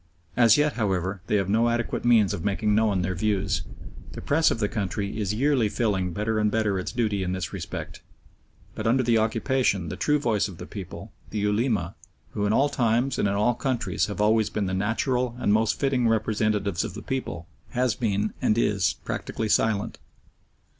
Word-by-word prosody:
As 115 -1 +6
yet, 150 0 +2
however, 95 -4 -1
they - - +1
have 100 -3 +1
no 115 +4 +2
adequate 120 0 -2
means 115 -5 +4
of 85 - -4
making 105 +1 0
known 105 -4 +2
their 95 +1 -1
views. 95 -1 0 0.5
The - - -7
Press 160 +3 +3
of - - -1
the 105 -2 0
country 100 +1 -3
is 100 -2 -1
yearly 130 -3 +2
filling 100 -5 0
better 105 +4 -1
and 105 0 +2
better 105 -3 0
its 90 - -4
duty 110 -5 0
in 90 0 -2
this 90 -4 -4
respect, - - -6 0.7
but 110 - -3
under 130 +3 +3
the 115 -2 +3
occupation 110 - 0
the - - -4
true 150 0 +2
voice 115 -8 0
of 95 -4 -10
the - - -8
people - - -8 0.2
the 110 - -5
Ulema, 105 -3 0 0.4
who 105 0 -1
in - - +1
all 135 +6 +3
times 125 -1 0
and - - +2
in 100 - 0
all 105 +4 +2
countries 130 0 -1
have 105 -3 -6
always 110 0 +3
been 105 - -2
the 95 - -2
natural 120 +5 0
and 105 - +2
most 110 0 +1
fitting 130 -4 +1
representatives 105 -4 0
of - - -6
the - - -8
people 130 -10 -4 0.3
has 125 -2 +1
been, 105 -2 -1
and 105 - +2
is, 100 -5 +1
practically 110 -1 -3
silent. 105 -1 +1
110 Hz, 195 wpm, -25 LUFS, 100-120 Hz, 0.7 s, As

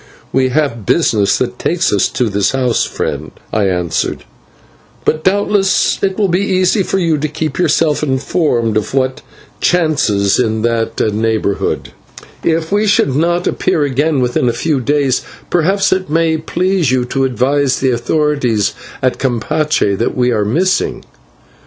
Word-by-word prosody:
"We 130 -1 +2
have 135 -5 -1
business 110 -12 +2
that - - -3
takes - - 0
us - - +3
to 125 - -1
his 100 +1 0
house, 125 -3 +1
friend," - - -4 0.2
I 105 -3 +2
answered; 90 -2 -2 0.8
"but 155 0 0
doubtless 200 0 +2
it 190 -1 0
will 210 -2 +2
be 180 0 +1
easy 185 +1 +2
for 195 - -1
you 165 -5 +1
to 155 - -1
keep 155 0 -4
yourself 160 -3 +2
informed 130 -5 0
of 110 +5 -3
what 130 -1 0 0.4
chances 130 - +1
in 110 -3 0
that 115 -1 -1
neighbourhood, 110 -2 -1 0.5
and - - +1
if 160 +1 -3
we 210 +1 +2
should 140 -10 +2
not 175 +3 +1
appear 150 - 0
again 145 +1 0
within 125 0 +1
a - - 0
few 140 +4 0
days, 135 0 +1 0.3
perhaps 190 +3 +2
it 185 -2 -3
may 160 +1 +2
please 175 0 0
you 130 -1 +1
to 135 +2 -1
advise 130 +2 +1
the 130 -1 +1
authorities 125 -4 0 0.3
at 130 -1 +1
Campeche 130 -2 0
that 115 - -1
we 125 0 +2
are 105 -3 +1
missing." 180 - 0
140 Hz, 155 wpm, -15 LUFS, 120-165 Hz, 0.8 s, us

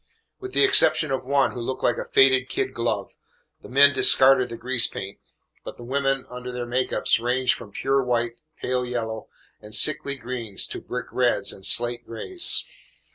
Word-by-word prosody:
With 385 0 -9
the - - +3
exception 395 - +5
of 130 -1 -4
one, 140 0 +1
who 120 - -7
looked 130 +2 -5
like 120 - 0
a - - -5
faded 130 -1 +3
kid 395 0 -3
glove, - - -4 0.4
the - - -13
men 140 +2 +5
discarded 130 -1 +4
the 115 - -8
grease 125 0 +1
paint, 95 +1 -8 0.4
but - - -9
the 120 - -11
women 135 +1 -2
under 125 0 -8
their 125 -1 -5
make 125 +2 -2
ups - - +1
ranged 125 +2 0
from 105 - -11
pure 135 +5 -1
white, 120 -1 -2 0.2
pale 125 0 -2
yellow, 115 -3 -5 0.3
and 105 0 -5
sickly 140 -2 +2
greens 120 -5 -3
to - - -7
brick 125 -2 -6
reds 120 -6 0
and 95 - -4
slate 120 0 +1
grays. 345 - +1
125 Hz, 185 wpm, -23 LUFS, 120-135 Hz, 0.4 s, exception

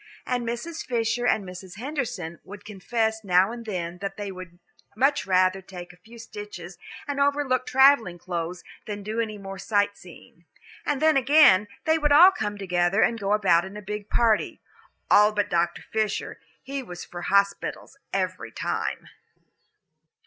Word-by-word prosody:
And 245 -2 -2
Mrs. 280 +9 -4
Fisher 235 0 -1
and 220 - +2
Mrs. 180 0 -10
Henderson 230 - -4
would 205 +1 -12
confess 220 +2 -2
now 185 +1 +3
and 235 -1 -8
then 180 -3 -4
that 195 0 -5
they 205 -1 -5
would 185 -2 -10 0.4
much 275 +4 +1
rather 185 0 +3
take 180 -1 -10
a - - -20
few 225 +6 -16
stitches 205 -6 -9 0.3
and 285 -1 -3
overlook 280 -3 +1
the - - -6
travelling 265 -9 +5
clothes 175 0 -5 0.2
than 205 -1 -5
do 215 +3 -3
any 215 -2 -2
more 195 -1 -8
sight 205 +1 +1
seeing. 170 -1 -16 0.4
And 295 0 0
then 315 -2 +5
again, 260 -8 +6 0.2
they 320 0 +3
would 295 -1 +1
all 345 +6 +9
come 210 - -4
together 180 +1 +1
and 230 - +1
go 200 0 0
about 195 -5 +3
in 190 +3 -8
a - - -7
big 210 +1 -6
party. 225 -3 +1 0.5
All 210 +1 +6
but 205 -1 -1
Dr. 170 0 0
Fisher 215 -2 -2 0.2
he 275 0 -4
was 180 -8 -9
for 175 - -8
hospitals 200 +1 0 0.2
every - - -3
time. - - -3
205 Hz, 165 wpm, -25 LUFS, 185-240 Hz, 0.5 s, all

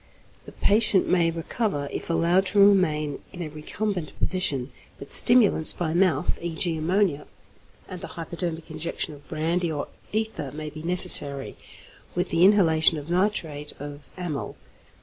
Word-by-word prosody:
The - - -12
patient 210 -2 +1
may 170 -2 +2
recover 165 -1 -3
if - - -6
allowed 175 +3 +1
to 205 - 0
remain 160 -8 +2
in 180 -2 -7
a 155 - -6
recumbent 175 +3 -5
position, 145 -9 -2 0.3
but 140 - -5
stimulants 230 -9 +6
by 160 -3 -3
mouth 170 -5 0
e.g., 170 0 -2
ammonia 160 -1 -1 0.6
and 180 -2 -9
the - - -7
hypodermic 170 -1 -6
injection 155 0 -4
of 145 0 -16
brandy 165 +2 -2
or 145 -2 -5 0.2
ether 215 -10 -3
may 155 0 -7
be 155 - -10
necessary, 160 -5 +5 0.6
with 180 - -2
the 170 - +1
inhalation 165 -5 +4
of 150 +3 -8
nitrite 175 -6 -2
of 145 0 -10
amyl. 170 -6 -5
165 Hz, 145 wpm, -24 LUFS, 150-185 Hz, 0.6 s, stimulants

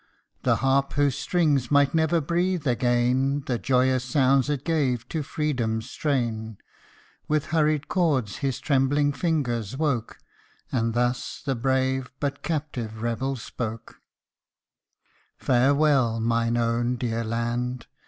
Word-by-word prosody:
The - - +3
harp 135 +1 +2
whose 145 -2 +2
strings 150 -8 +1
might 140 -1 +4
never 160 +1 +2
breathe 170 +2 -1
again 125 +2 +1
The 120 -3 -1
joyous 130 -1 +2
sounds 135 +1 +2
it 145 -2 -2
gave 140 -8 0
to 160 - -2
Freedom's 125 -6 -2
strain, 115 -7 -2 0.7
With 155 0 -1
hurried 155 -2 +2
chords, 145 - 0
his 135 -2 -2
trembling 145 +1 +2
fingers 130 - -1
woke; 140 -7 -1 0.5
And 115 -2 0
thus 120 0 -1
the 135 - +1
brave, 130 +1 0
but 140 -1 -2
captive 125 -9 -4
rebel 130 +4 -1
spoke: 115 -2 -6 1.4
Farewell! 135 -2 +3
mine 115 +1 +1
own 120 +1 0
dear 115 -1 -2
land 120 +2 -2
130 Hz, 120 wpm, -25 LUFS, 120-145 Hz, 1.4 s, might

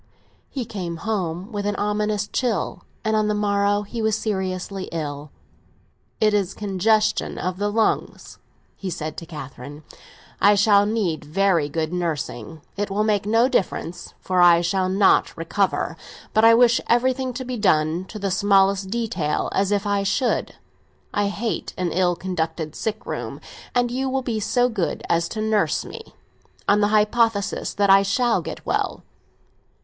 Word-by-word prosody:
He 260 -4 -4
came 180 -6 -5
home 190 -2 -2
with 205 -1 -3
an 205 - -1
ominous 210 0 -1
chill, 230 -7 -2 0.2
and 220 0 +2
on 215 -1 +2
the 210 - +1
morrow 205 0 +1
he 225 +3 -5
was 220 -1 +1
seriously 190 -2 -3
ill. 150 -2 -5 0.9
"It 215 -1 +3
is 195 -2 0
congestion 210 +2 +1
of 185 0 -3
the 205 0 0
lungs," 220 +1 -1 0.4
he 195 - -5
said 155 -2 -5
to 165 - -7
Catherine; 145 -1 -9 0.6
"I 205 +1 +6
shall 205 0 +4
need 200 -8 -1
very 165 -1 +1
good 155 +2 -2
nursing. 160 -4 -4
It 205 +1 -2
will 200 +2 0
make 205 -2 +1
no 225 +3 +4
difference, 180 -7 -2
for 185 -1 +1
I 170 -1 +7
shall 185 +1 0
not 195 +1 +3
recover; 185 +4 -1 0.4
but 220 - +3
I 230 0 +8
wish 240 0 +4
everything 255 +2 +1
to 260 +1 -5
be 250 0 -4
done, 165 -4 +1
to 215 - -9
the 200 -2 -2
smallest 195 0 +3
detail, 190 -9 -1
as 195 0 +1
if 205 0 +1
I 200 -1 +1
should. 210 +6 0 0.6
I 205 0 +1
hate 215 +3 -3
an 180 -2 -1
ill 180 0 +2
conducted 160 -3 -3
sick 220 0 -4
room; - - -5 0.4
and 245 -1 +2
you 265 +2 -1
will 265 0 -1
be 230 -3 -2
so 245 +4 +2
good 205 -8 -2
as 170 0 +1
to 215 - -4
nurse 215 -1 +1
me 450 -1 -11 0.5
on 205 +1 +4
the 205 - +4
hypothesis 215 0 +1
that 200 -1 +3
I 195 0 +7
shall 240 +4 +1
get - - -8
well." - - -1
200 Hz, 165 wpm, -23 LUFS, 180-220 Hz, 0.9 s, I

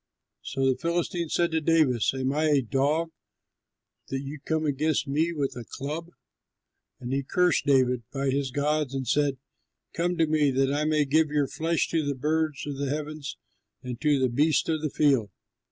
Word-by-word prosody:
So 135 0 -2
the 130 -1 +3
Philistine 170 +1 -2
said 170 +1 +1
to 160 0 0
David, 155 -7 +3
"Am 130 +1 -1
I 155 +2 +1
a 145 -3 +4
dog 145 +7 0 1.0
that 135 0 -3
you 140 +2 -7
come 160 -1 -1
against 150 +1 0
me 155 +5 +1
with 145 -5 -2
a 120 - -6
club?" 150 +8 -6 0.9
And 125 +1 -4
he 140 - +1
cursed 180 +3 +1
David 130 -3 +3
by 135 -1 -1
his 140 0 -1
gods, 145 0 -1
and 135 -2 -3
said, 145 +1 +1 0.6
"Come 175 +1 -1
to 165 - +4
me 155 -2 +2
that 135 +1 +1
I 150 +1 0
may 155 -1 +2
give 155 +3 +3
your 145 -2 +1
flesh 165 +3 0
to 165 -2 0
the 145 -1 -2
birds 155 +2 -1
of 145 -2 -5
the 140 -1 -2
heavens 150 0 -4 0.5
and 125 -2 -6
to 150 -2 +3
the 130 -1 +2
beasts 150 +6 +2
of 160 -2 0
the 155 - -1
field." 135 -7 +2
145 Hz, 185 wpm, -27 LUFS, 135-155 Hz, 1.0 s, a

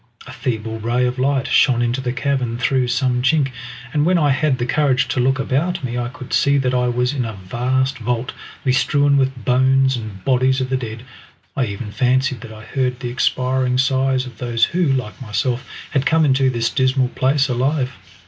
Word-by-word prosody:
A - - -10
feeble 110 -2 -3
ray 120 +3 0
of 125 +1 -2
light 135 0 +1
shone 120 -3 +3
into 120 +2 -1
the 125 -2 -2
cavern 125 -2 -1
through 130 +1 +1
some 125 0 0
chink, 135 +1 +2 0.4
and 150 - +2
when 180 +3 +3
I 150 -4 +3
had 135 0 +1
the 120 - -2
courage 135 -1 +1
to - - -1
look 130 +1 +2
about 155 +6 -1
me 120 -1 -3
I 120 0 -2
could 130 -1 -9
see 140 0 +3
that 130 -2 0
I 125 -1 +1
was 125 +2 0
in 135 -3 -1
a 115 -2 -4
vast 125 +7 -1
vault, 120 +1 -2 0.3
bestrewn 140 +2 +2
with 130 -4 0
bones 130 +1 +3
and 110 -5 -8
bodies 130 0 +2
of 130 0 -3
the - - +2
dead. 115 -2 -6 0.5
I 130 - +1
even 105 +1 -6
fancied 130 +2 +1
that 115 -2 -9
I 110 0 -11
heard 125 0 -2
the 125 -2 -4
expiring 125 0 0
sighs 130 0 +1
of 120 -4 -12
those 120 -2 +2
who, 175 -1 0
like 130 -4 -2
myself, 120 +3 -2 0.2
had 140 -1 +1
come 160 -1 +3
into 135 -1 +3
this 120 -2 -1
dismal 130 -1 +1
place 135 +2 +1
alive. 130 +1 0
130 Hz, 200 wpm, -19 LUFS, 120-135 Hz, 0.5 s, shone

